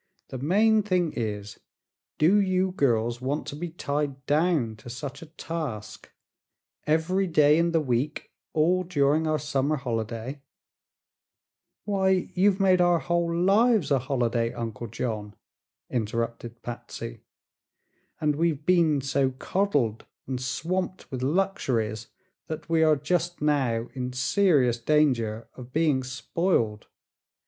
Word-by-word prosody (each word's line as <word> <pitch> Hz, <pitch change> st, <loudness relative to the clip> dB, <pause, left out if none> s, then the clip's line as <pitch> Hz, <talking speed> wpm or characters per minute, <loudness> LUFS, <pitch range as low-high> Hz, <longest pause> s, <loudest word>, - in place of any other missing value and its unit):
"The 130 Hz, -, -6 dB
main 215 Hz, -, +3 dB
thing 180 Hz, -5 st, 0 dB
is, 105 Hz, -3 st, -4 dB, 0.6 s
do 190 Hz, +7 st, +5 dB
you 185 Hz, -1 st, +1 dB
girls 120 Hz, -7 st, +1 dB
want 140 Hz, +4 st, -2 dB
to -, -, -6 dB
be 170 Hz, +3 st, -5 dB
tied 145 Hz, -4 st, -3 dB
down 145 Hz, -6 st, +1 dB
to 115 Hz, -, -11 dB
such 140 Hz, +2 st, -6 dB
a 165 Hz, -, -10 dB
task? 155 Hz, -9 st, -6 dB, 0.8 s
Every 175 Hz, +5 st, +1 dB
day 150 Hz, -2 st, +4 dB
in 170 Hz, 0 st, +2 dB
the 165 Hz, -, +3 dB
week, 135 Hz, +2 st, -2 dB, 0.2 s
all 170 Hz, +4 st, +2 dB
during 155 Hz, -2 st, +2 dB
our 155 Hz, 0 st, +2 dB
summer 150 Hz, 0 st, 0 dB
holiday 120 Hz, +1 st, -4 dB, 0.7 s
" -, -, -63 dB
"Why, 190 Hz, -2 st, +1 dB
you've 195 Hz, +1 st, +3 dB
made 185 Hz, -2 st, +4 dB
our 175 Hz, -1 st, +4 dB
whole 170 Hz, 0 st, 0 dB
lives 195 Hz, +2 st, +3 dB
a 140 Hz, -, +4 dB
holiday, 120 Hz, -3 st, 0 dB
Uncle 115 Hz, 0 st, -5 dB
John," 105 Hz, -2 st, -4 dB, 0.5 s
interrupted 115 Hz, 0 st, -3 dB
Patsy, 120 Hz, -, -7 dB, 1.0 s
"and 150 Hz, -2 st, +1 dB
we've 155 Hz, -3 st, 0 dB
been 165 Hz, -6 st, +3 dB
so 135 Hz, 0 st, +1 dB
coddled 130 Hz, -, -1 dB, 0.2 s
and 130 Hz, -1 st, -4 dB
swamped 180 Hz, +8 st, -3 dB
with 130 Hz, -2 st, -4 dB
luxuries 130 Hz, -, 0 dB, 0.4 s
that 155 Hz, -, -6 dB
we 165 Hz, -1 st, +2 dB
are 155 Hz, -1 st, +5 dB
just 175 Hz, +4 st, -1 dB
now 130 Hz, -6 st, +1 dB
in 125 Hz, -1 st, -4 dB
serious 130 Hz, -, +2 dB
danger 115 Hz, -5 st, +1 dB
of 125 Hz, -1 st, -11 dB
being 150 Hz, -2 st, +2 dB
spoiled! 125 Hz, -, -1 dB
145 Hz, 130 wpm, -26 LUFS, 120-170 Hz, 1.0 s, do